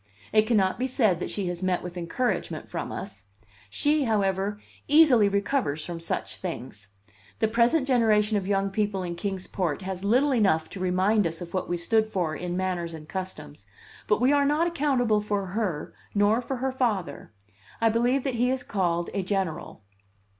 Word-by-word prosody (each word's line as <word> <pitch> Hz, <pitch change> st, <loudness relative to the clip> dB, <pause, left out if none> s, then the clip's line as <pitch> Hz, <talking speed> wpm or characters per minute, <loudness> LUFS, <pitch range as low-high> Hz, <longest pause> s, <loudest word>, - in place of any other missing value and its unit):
It 215 Hz, 0 st, +4 dB
cannot 200 Hz, -3 st, +2 dB
be 255 Hz, -, 0 dB
said 220 Hz, -, +2 dB
that -, -, -3 dB
she 200 Hz, -, -3 dB
has 175 Hz, 0 st, -5 dB
met 185 Hz, -1 st, 0 dB
with 180 Hz, 0 st, -7 dB
encouragement 180 Hz, +9 st, -2 dB
from -, -, -5 dB
us; 195 Hz, -, -7 dB, 0.4 s
she, 290 Hz, -, +1 dB
however, 200 Hz, -2 st, 0 dB, 0.3 s
easily 280 Hz, -9 st, +6 dB
recovers 200 Hz, -, -1 dB
from 170 Hz, -1 st, -5 dB
such 165 Hz, -, -2 dB
things. 125 Hz, -, -6 dB, 0.5 s
The 220 Hz, -, +2 dB
present 240 Hz, +6 st, +2 dB
generation 220 Hz, -4 st, +3 dB
of 195 Hz, -2 st, -1 dB
young 195 Hz, -1 st, +1 dB
people 205 Hz, -2 st, -1 dB
in 175 Hz, -1 st, -3 dB
Kings 190 Hz, +1 st, -4 dB
Port 180 Hz, -2 st, -2 dB
has 190 Hz, 0 st, -5 dB
little 255 Hz, +7 st, +3 dB
enough 190 Hz, -9 st, +2 dB
to 195 Hz, -, -7 dB
remind 185 Hz, +2 st, +2 dB
us 165 Hz, 0 st, -5 dB
of 175 Hz, -1 st, -8 dB
what 185 Hz, -1 st, -2 dB
we 175 Hz, -, 0 dB
stood 220 Hz, +6 st, +2 dB
for 175 Hz, -7 st, -2 dB
in 175 Hz, +2 st, -4 dB
manners 175 Hz, -3 st, -2 dB
and 155 Hz, -1 st, -11 dB
customs, 100 Hz, -, -6 dB, 0.4 s
but 210 Hz, -, +2 dB
we 255 Hz, +4 st, +4 dB
are 285 Hz, -1 st, +4 dB
not 295 Hz, +4 st, +2 dB
accountable 270 Hz, -10 st, +1 dB
for 205 Hz, -1 st, -1 dB
her, 185 Hz, -5 st, -3 dB, 0.2 s
nor 205 Hz, +3 st, +3 dB
for 265 Hz, +2 st, -4 dB
her 260 Hz, +1 st, -1 dB
father. 210 Hz, -, -2 dB, 0.5 s
I 230 Hz, -, +4 dB
believe 245 Hz, +4 st, +1 dB
that 270 Hz, -, -1 dB
he 245 Hz, +1 st, +1 dB
is 260 Hz, 0 st, -1 dB
called 175 Hz, -4 st, -1 dB
a 200 Hz, -, 0 dB
general. 185 Hz, -, -3 dB
200 Hz, 180 wpm, -26 LUFS, 180-235 Hz, 0.5 s, easily